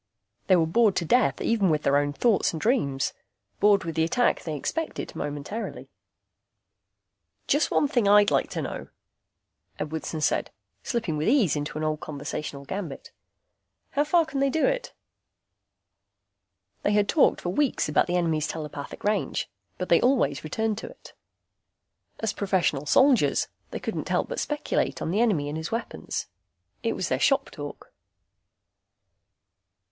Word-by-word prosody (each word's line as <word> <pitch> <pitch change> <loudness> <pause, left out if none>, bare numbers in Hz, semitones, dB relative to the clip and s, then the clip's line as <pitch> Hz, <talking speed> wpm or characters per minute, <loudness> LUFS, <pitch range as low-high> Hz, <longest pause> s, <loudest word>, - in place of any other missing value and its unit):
They 185 - +6
were 165 -2 +3
bored 205 +4 +3
to 170 - 0
death 245 +9 +3
even 215 -5 +2
with 150 -1 +1
their 140 - +3
own 145 0 +2
thoughts 215 +6 +2
and 160 - -4
dreams, 150 - +1 0.5
bored 205 -1 +4
with 165 -1 -4
the 160 0 +1
attack 245 +9 +2
they 155 -3 -4
expected 320 - -4
momentarily. 145 +10 -5 1.5
"Just 295 +2 +2
one 290 - +2
thing 240 -6 +1
I'd 205 0 +6
like - - +2
to - - -3
know," - - -5 0.9
Edwardson 155 +1 -4
said, 150 - +1 0.3
slipping 220 - -2
with 150 - -1
ease 230 - +3
into 145 +1 -3
an 155 - -3
old 155 -1 -1
conversational 145 -1 -5
gambit. 175 -4 -6 0.8
"How 290 - +2
far 330 +2 +3
can 290 -3 -4
they 275 0 +3
do 315 +3 +1
it?" - - -1 1.9
They 205 - +1
had 205 -1 +3
talked 310 - +3
for 175 - -2
weeks 270 +9 +1
about 150 - +2
the 180 0 +1
enemy's 160 -3 +1
telepathic 150 -3 -6
range, 205 - -1 0.3
but 180 - -4
they 170 - +5
always 245 - +2
returned 220 +7 -1
to - - -7
it. - - -14 1.1
As 225 -1 -1
professional 180 -9 0
soldiers, 265 - +4 0.2
they - - -5
couldn't - - -4
help - - 0
but - - -3
speculate 295 0 -1
on 165 - -2
the 205 +5 +2
enemy 185 -12 +2
and 150 +2 -3
his 160 - -5
weapons. 225 - -4 0.6
It - - 0
was - - -2
their - - 0
shop - - +2
talk. - - -9
185 Hz, 155 wpm, -26 LUFS, 155-235 Hz, 1.9 s, They